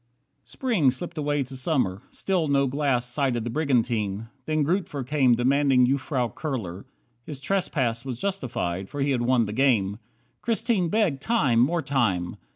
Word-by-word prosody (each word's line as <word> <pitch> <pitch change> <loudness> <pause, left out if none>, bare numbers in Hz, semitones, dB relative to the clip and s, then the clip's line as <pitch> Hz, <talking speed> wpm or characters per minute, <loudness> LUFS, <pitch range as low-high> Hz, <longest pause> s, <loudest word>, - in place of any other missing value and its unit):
38 - - -20
Spring 220 - +1
slipped 165 +6 -4
away 145 -1 0
to 130 +1 -10
Summer. 130 - 0
Still 180 -5 -1
no 140 -1 +3
glass 135 -2 0
Sighted 125 -2 0
the 120 - -3
brigantine. 115 -7 0 0.2
Then 155 -1 +1
Grootver 150 -4 -1
came 130 -3 +3
Demanding 130 +1 +3
Jufvrouw 130 -3 -1
Kurler. 105 - -4 0.4
His 145 -1 -7
trespass 135 -9 -1
Was 130 -3 -5
justified, 120 - -3
for 145 - -4
he 140 +1 +1
had 125 -3 +1
won 120 -1 +3
the 105 - -5
game. 110 -6 +2 0.4
Christine 225 -6 +1
begged 175 -9 +1
time, 145 - +2
more 160 +7 +2
time! 105 -11 0
135 Hz, 160 wpm, -25 LUFS, 120-150 Hz, 0.4 s, no